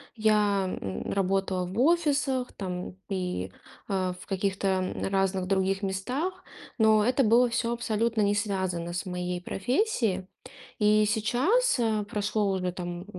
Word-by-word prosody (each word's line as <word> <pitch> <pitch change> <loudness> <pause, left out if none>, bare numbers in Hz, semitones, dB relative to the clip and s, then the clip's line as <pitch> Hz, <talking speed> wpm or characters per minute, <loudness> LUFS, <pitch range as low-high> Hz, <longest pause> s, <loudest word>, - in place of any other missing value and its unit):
Я, 210 -4 +2
м, 95 -1 -4
работала 190 -1 0
в 185 +5 -4
офисах, 285 -5 +2
там, 180 -2 -5
и, 180 - -3 0.4
э, 185 -2 0
в - - -11
каких-то 190 -1 0 0.2
разных 195 -1 +1
других 195 0 +1
местах. 255 - -3 0.3
Но 220 -2 +5
это 255 +3 +3
было 240 +2 +5
всё 235 0 0
абсолютно 230 -1 0
не 205 0 +2
связано 190 -5 -2
с 175 - -3
моей 180 -1 -3
профессией. 220 - 0 0.5
И 210 0 +4
сейчас, 260 - +2
э, 220 -3 +1
прошло 210 0 0
уже, 185 -1 -1
там, 175 0 -6
200 Hz, 130 wpm, -28 LUFS, 185-230 Hz, 0.5 s, Но